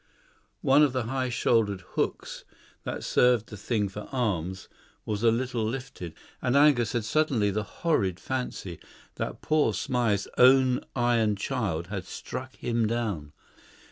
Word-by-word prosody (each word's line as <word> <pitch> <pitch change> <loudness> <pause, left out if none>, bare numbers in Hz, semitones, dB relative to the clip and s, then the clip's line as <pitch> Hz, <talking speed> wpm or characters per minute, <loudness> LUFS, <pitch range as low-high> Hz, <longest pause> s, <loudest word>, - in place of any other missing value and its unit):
One 135 +2 +5
of 145 -4 +4
the 130 -2 0
high 130 +2 -2
shouldered 110 -4 +1
hooks - - -3 0.4
that - - -4
served 125 -3 +3
the 105 - -8
thing 105 0 -1
for 100 +2 -8
arms, 95 - -2 0.4
was 105 -1 -2
a 115 - +5
little 120 0 -1
lifted, 115 -7 -5 0.3
and 125 +1 +1
Angus 140 -6 +4
had 120 -3 -1
suddenly 120 -5 +2
the 105 +2 -1
horrid 105 - -1
fancy 125 -9 -4 0.4
that - - -4
poor 150 -9 +2
Smythe's 115 -4 0
own 130 0 +6
iron 120 -4 +2
child 100 -7 -2
had 95 -2 -4
struck 130 +6 -7
him 115 -2 0
down. 105 -11 -2
115 Hz, 140 wpm, -27 LUFS, 105-130 Hz, 0.4 s, own